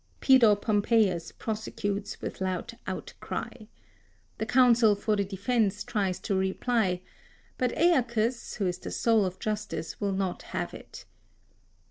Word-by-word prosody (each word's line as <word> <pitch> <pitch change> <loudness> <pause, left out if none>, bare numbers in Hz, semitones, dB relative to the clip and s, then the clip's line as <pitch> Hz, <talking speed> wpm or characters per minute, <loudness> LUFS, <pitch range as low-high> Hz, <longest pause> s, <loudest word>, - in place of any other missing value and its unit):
Pedo 245 -6 +6
Pompeius 205 -4 +1
prosecutes 205 -2 -4
with - - -5
loud 185 +4 -2
outcry. - - -5 0.9
The 220 - -2
counsel 240 -3 +5
for 210 +1 0
the 200 - +1
defence 205 +1 0
tries 195 -4 -1
to - - -2
reply; 190 0 0 0.6
but 250 -1 +1
Aeacus, 240 -8 +1
who 205 - -1
is 180 0 -1
the - - -7
soul 225 -3 +2
of 185 0 -6
justice, 210 -7 -4
will 200 -1 0
not 190 -2 -2 0.2
have - - -3
it. - - -11
210 Hz, 130 wpm, -28 LUFS, 190-230 Hz, 0.9 s, Pedo